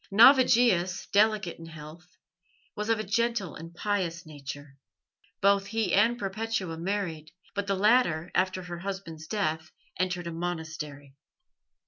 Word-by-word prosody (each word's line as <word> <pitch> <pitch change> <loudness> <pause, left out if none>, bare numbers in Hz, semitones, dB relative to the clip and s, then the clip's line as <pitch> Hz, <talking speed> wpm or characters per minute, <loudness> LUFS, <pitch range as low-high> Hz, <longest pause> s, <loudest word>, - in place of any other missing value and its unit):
Navigius, 230 -5 +5
delicate 210 -4 +2
in 165 - -9
health, 160 +3 -12 0.6
was 210 +1 -3
of 225 -1 +2
a - - -1
gentle 230 -2 0
and 165 +1 -9
pious 175 -2 -2
nature. 145 -2 -9 0.6
Both 200 0 +3
he 225 0 -1
and 230 +4 +4
Perpetua 195 -4 -3
married, 170 -4 -3 0.2
but 200 0 -3
the 195 - +1
latter 190 -6 +3
after 185 0 0
her 175 -1 -7
husband's 175 -4 -6
death 160 -6 -1 0.3
entered 180 -1 -1
a 170 - -4
monastery. 160 -4 -5
185 Hz, 130 wpm, -28 LUFS, 165-210 Hz, 0.6 s, Navigius